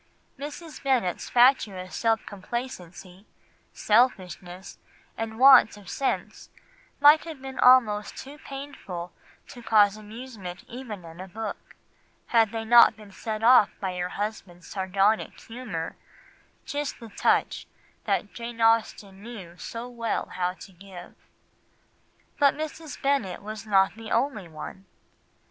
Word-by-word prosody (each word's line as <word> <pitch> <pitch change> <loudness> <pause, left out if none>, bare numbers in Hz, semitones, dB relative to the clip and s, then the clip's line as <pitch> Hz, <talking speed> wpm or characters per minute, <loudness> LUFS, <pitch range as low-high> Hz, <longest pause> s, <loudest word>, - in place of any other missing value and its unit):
Mrs. 300 +3 -8
Bennet's 250 -10 0
fatuous 220 -7 +3
self 225 -1 +1
complacency, 190 -3 -7 0.4
selfishness, 190 -5 0 0.4
and 220 0 -5
want 260 -4 +7
of 200 -3 -10
sense 275 - -3 0.5
might 295 +2 +7
have 320 -4 -8
been 265 0 -8
almost 230 -5 +4
too 285 +3 -9
painful 270 - -8 0.4
to 245 -3 -11
cause 210 -2 +4
amusement 215 -4 -9
even 230 -7 -8
in 165 +1 -12
a 190 - -8
book, 215 +2 -7 0.5
had 225 -3 +4
they 225 -1 -4
not 235 0 +7
been 210 -2 -14
set 215 +2 -5
off 235 -3 +7
by 190 -2 -3
her 180 0 -2
husband's 195 -4 -5
sardonic 195 +2 0
humour, 225 -9 -6 0.7
just 290 -2 -4
the 230 -2 -10
touch - - 0 0.4
that - - -1
Jane 235 0 -7
Austen 220 -3 +1
knew 205 -7 -10
so 230 +6 -6
well 235 -2 -3
how 180 0 -2
to 190 - -13
give. 180 -1 -12 1.3
But 280 -1 +5
Mrs. 310 0 -6
Bennet 275 -10 -1
is 215 +1 -7
not 195 -2 +4
the 225 0 -9
only 230 -6 0
one. 170 +4 -9
220 Hz, 125 wpm, -26 LUFS, 190-250 Hz, 1.3 s, want